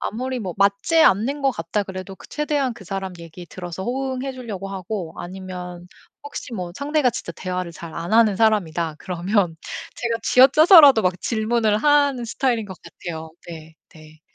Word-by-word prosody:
아무리 255 +3 -3
뭐 185 -5 -5
맞지 200 +12 +2
않는 265 +9 +2
것 270 - +3
같다 170 +4 -2
그래도 190 0 -8
그 - - -14
최대한 295 -3 -1
그 205 - -13
사람 190 +1 -4
얘기 170 +2 -10
들어서 180 +1 -7
호응해 265 +2 -3
주려고 215 -7 -7
하고 185 -3 -5
아니면 180 -1 -8 0.4
혹시 285 -3 -7
뭐 180 -4 -5
상대가 285 -3 +1
진짜 170 - -6
대화를 180 0 -4
잘 165 +1 -9
안 175 +5 -5
하는 225 -3 +5
사람이다 175 -8 +1
그러면 180 -1 -1 0.4
제가 230 -1 -2
쥐어짜서라도 280 - +7
막 180 -1 0
질문을 220 -1 +1
하는 285 -2 +3
스타일인 235 -1 -1
것 190 - -9
같아요. 160 -2 -8 0.2
네. 160 -1 -10 0.2
네. 155 -2 -17
200 Hz, 345 characters per minute, -22 LUFS, 180-250 Hz, 0.4 s, 쥐어짜서라도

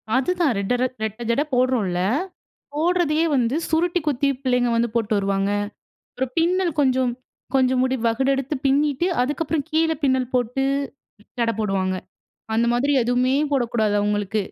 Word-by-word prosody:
அதுதான் 320 +1 +1
ரெட்ட 200 +5 -1
ரட் 255 0 -1
ரெட்ட 220 +2 -4
ஜட 235 +5 +2
போடுறோன்ல்ல! 245 -8 +1 0.8
போடுறதயே 330 -1 +1
வந்து, 245 0 +1
சுருட்டி 345 +2 +1
குத்தி 280 -1 +1
பிள்ளைங்க 250 -2 +1
வந்து 235 +1 +1
போட்டு 225 -2 0
வருவாங்க. 195 0 0 0.6
அப்புறம் 260 0 -3
பின்னல் 350 +1 +2
கொஞ்சம், 260 -3 +2 0.4
கொஞ்சம் 255 -1 +3
முடி 260 0 +1
வகுடு 265 +4 +1
எடுத்து 275 +2 -3
பின்னிட்டு, 285 +4 +2
அதுக்கப்புறம் 295 +2 -1
கீழ 320 +1 +2
பின்னல் 260 -2 +1
போட்டு, 250 +2 0 0.8
சடை 230 -1 +1
போடுவாங்க. 190 -3 0 0.6
அந்த 230 +1 +2
மாதிரி 275 +4 +1
எதுவுமே 250 +2 +1 0.2
போடக்கூடாது. 230 -5 +1
அவுங்களுக்கு 205 0 0
255 Hz, 135 wpm, -22 LUFS, 230-290 Hz, 0.8 s, கொஞ்சம்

